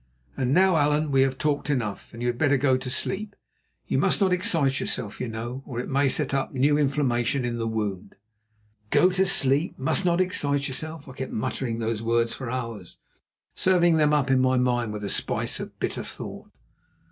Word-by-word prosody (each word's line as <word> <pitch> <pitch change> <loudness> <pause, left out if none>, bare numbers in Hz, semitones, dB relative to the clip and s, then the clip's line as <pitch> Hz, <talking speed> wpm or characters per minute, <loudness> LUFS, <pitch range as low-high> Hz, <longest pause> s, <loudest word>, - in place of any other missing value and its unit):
And 130 -2 -1
now, 185 +2 +4
Allan, 150 0 +2
we 135 -1 +4
have 135 0 +1
talked 150 0 -1
enough, 115 -8 -2
and 115 +1 -7
you - - 0
had 120 0 -3
better 145 -3 +3
go 130 0 +3
to 130 0 -4
sleep. 200 - -3 0.5
You - - 0
must - - +2
not 190 -3 +3
excite 155 -7 +2
yourself, 105 -5 -3
you 125 - -2
know, 120 +3 -5
or 120 -4 -6
it 125 - -5
may 140 +1 +3
set 140 +1 -1
up 135 -1 -1
new 140 +3 +3
inflammation 135 -3 +1
in 120 -1 -3
the 115 - -1
wound." 105 -3 -3 0.7
"Go 185 - +4
to 190 +1 +2
sleep. 145 -2 +1
Must 160 +8 +1
not 175 -1 +2
excite 145 -6 +1
yourself." 155 +3 -6
I 130 - -9
kept 130 0 -6
muttering 115 +1 -2
those 115 -1 -2
words 115 0 +1
for 130 -3 -6
hours, 115 -7 -5 0.6
serving 175 -3 +3
them 150 -1 +3
up 140 -3 +2
in 130 - +4
my 130 0 +3
mind 120 -3 +1
with 105 -1 -6
a - - -2
spice - - -1
of - - -8
bitter - - -2
thought. - - -7
135 Hz, 200 wpm, -25 LUFS, 120-150 Hz, 0.7 s, now